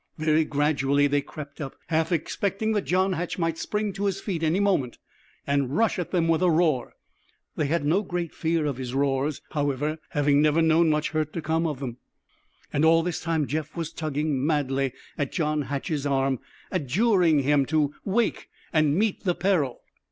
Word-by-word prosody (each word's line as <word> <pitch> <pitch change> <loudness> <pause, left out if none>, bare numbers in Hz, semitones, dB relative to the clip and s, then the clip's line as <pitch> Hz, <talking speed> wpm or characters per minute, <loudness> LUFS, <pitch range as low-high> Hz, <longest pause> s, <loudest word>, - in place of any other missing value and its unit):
Very 155 0 +2
gradually 145 -1 +2
they 145 0 +2
crept 145 0 -9
up, 135 -2 -5
half 160 +1 +1
expecting 200 +6 -1
that 205 -3 0
John 185 +2 +2
Hatch 175 +1 -3
might 165 -2 -1
spring 210 -1 -2
to 200 +1 -3
his 195 -1 0
feet 185 -5 -3
any 165 +3 +2
moment 185 -12 +1 0.5
and 140 +1 0
rush 225 -4 +2
at 175 - -3
them 170 -3 +1
with 165 0 +2
a 180 - +4
roar. 155 -6 +1 0.6
They 150 - 0
had 160 0 0
no 170 +7 +3
great 175 -4 -4
fear 165 -1 0
of 140 -4 -2
his 130 -1 -5
roars, 140 +1 0
however, 145 +1 -1
having 145 0 +3
never 155 +1 +3
known 160 0 +4
much 150 0 0
hurt 155 -1 -1
to 165 - -3
come 160 +1 +1
of 150 -4 -4
them. 125 -4 -5 0.8
And 145 - +1
all 165 +1 +5
the 175 0 -1
time 160 -2 -1
Jeff 155 +3 -4
was 165 -2 -4
tugging 150 -3 -1
madly 135 -3 0 0.3
at 145 - -1
John 155 -3 0
Hatch's 145 +1 -2
arm, 135 -2 +1 0.3
adjuring 175 - +3
him 140 -1 +3
to 150 -2 +1
wake 220 +4 0 0.2
and 155 -2 +3
meet 215 0 0
the 180 -3 +1
peril. 170 -10 0
155 Hz, 185 wpm, -26 LUFS, 145-175 Hz, 0.8 s, all